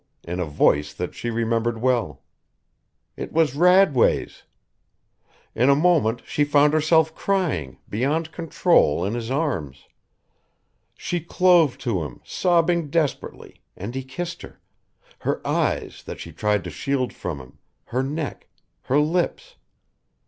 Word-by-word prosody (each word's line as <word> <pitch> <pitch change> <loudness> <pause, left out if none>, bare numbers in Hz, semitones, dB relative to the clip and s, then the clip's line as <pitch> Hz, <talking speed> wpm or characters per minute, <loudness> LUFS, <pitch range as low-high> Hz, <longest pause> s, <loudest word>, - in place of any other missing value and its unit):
in 90 +2 -5
a 90 - 0
voice 75 0 +1
that 90 +2 -4
she 90 +7 -4
remembered 115 0 0
well. 115 - 0 0.9
It - - -6
was 160 -4 +2
Radway's. 180 -3 +3 1.1
In 125 +4 +2
a 140 - +6
moment 145 -8 +2
she 145 - 0
found 145 0 +4
herself 160 0 +3
crying, 160 - -1
beyond 150 +9 -1
control, 165 - +2
in 100 - -2
his 120 -1 -4
arms. 125 - -2 1.1
She 175 - -2
clove 170 -3 +3
to 105 -8 0
him, 75 -5 -7
sobbing 170 -3 +1
desperately, 155 -2 -3 0.2
and 100 +6 -6
he 130 0 -4
kissed 175 +6 -6
her, - - -12 0.6
her - - -1
eyes, - - -1
that - - -7
she - - -8
tried 105 -2 0
to 90 - -6
shield 130 - -2
from 90 -5 -5
him, 65 +3 -15 0.3
her 125 - -1
neck, 145 +2 -4 0.4
her 135 - +2
lips. 175 - -1
135 Hz, 135 wpm, -23 LUFS, 105-165 Hz, 1.1 s, a